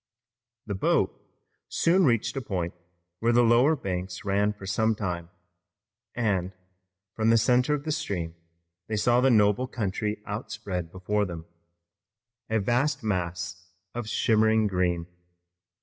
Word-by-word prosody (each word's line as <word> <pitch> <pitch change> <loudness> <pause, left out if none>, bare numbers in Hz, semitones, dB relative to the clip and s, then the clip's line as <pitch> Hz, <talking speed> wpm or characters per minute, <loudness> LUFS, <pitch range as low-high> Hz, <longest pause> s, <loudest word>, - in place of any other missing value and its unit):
The 105 - -3
boat 95 - +2 0.6
soon 180 +2 +3
reached 115 -2 +1
a 135 - -2
point 90 -6 -3 0.5
where 115 +1 +2
lower 120 +5 +5
banks 95 -6 -4
ran 100 +1 +2
for 105 -2 -10
some 110 +3 +1
time, 90 -5 -4 0.9
and, 95 -6 0 0.6
from 110 +1 +1
the 115 - +6
center 125 +5 +3
of 145 - -5
the 155 - -2
stream, 90 - -3 0.5
they 110 - -2
saw 120 +3 +3
the 135 - +4
noble 105 +1 +3
country 105 -2 -3
outspread 100 -5 -4
before 105 +3 -1
them, 85 -3 -7 1.0
a 110 0 +2
vast 125 +6 +1
mass 90 -2 -3 0.2
of 120 -2 -4
shimmering 110 0 +3
green. 90 -3 0
105 Hz, 130 wpm, -27 LUFS, 95-120 Hz, 1.0 s, the